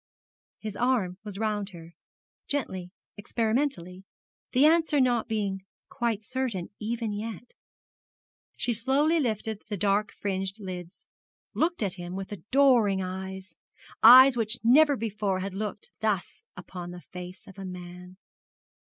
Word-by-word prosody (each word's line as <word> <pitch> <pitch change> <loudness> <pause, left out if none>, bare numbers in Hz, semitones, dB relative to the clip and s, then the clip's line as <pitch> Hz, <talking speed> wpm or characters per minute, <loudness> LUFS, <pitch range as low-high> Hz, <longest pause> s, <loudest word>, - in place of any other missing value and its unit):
His 215 -2 -6
arm 225 -8 0
was 205 -3 -7
round 210 -2 -1
her, 165 0 -11 0.5
gently, 190 -11 -3 0.3
experimentally, 220 -4 -1 0.5
the 260 +4 +5
answer 320 -2 +4
not 245 -3 +2
being 200 -3 -2 0.3
quite 230 -4 -1
certain, 235 -7 -3
even 225 0 -2
yet. 220 +2 -6 1.0
She 240 - +1
slowly 275 +8 +2
lifted 220 -5 -2
the 205 - -2
dark 205 +2 +1
fringed 195 +1 -3
lids, 180 -2 -8 0.5
looked 330 -6 0
at 195 -3 -1
him 175 -1 -7
with 195 +2 -6
adoring 210 - +3
eyes 190 -1 -6 0.5
eyes 255 +3 +10
which 225 0 -1
never 285 +4 +6
before 210 -3 -1
had 195 0 -4
looked 210 +1 -5
thus 210 -4 -2
upon 180 -1 -8
the 175 0 -9
face 180 +1 -10
of 195 - -13
man. 180 -1 -9
210 Hz, 130 wpm, -28 LUFS, 185-240 Hz, 1.0 s, eyes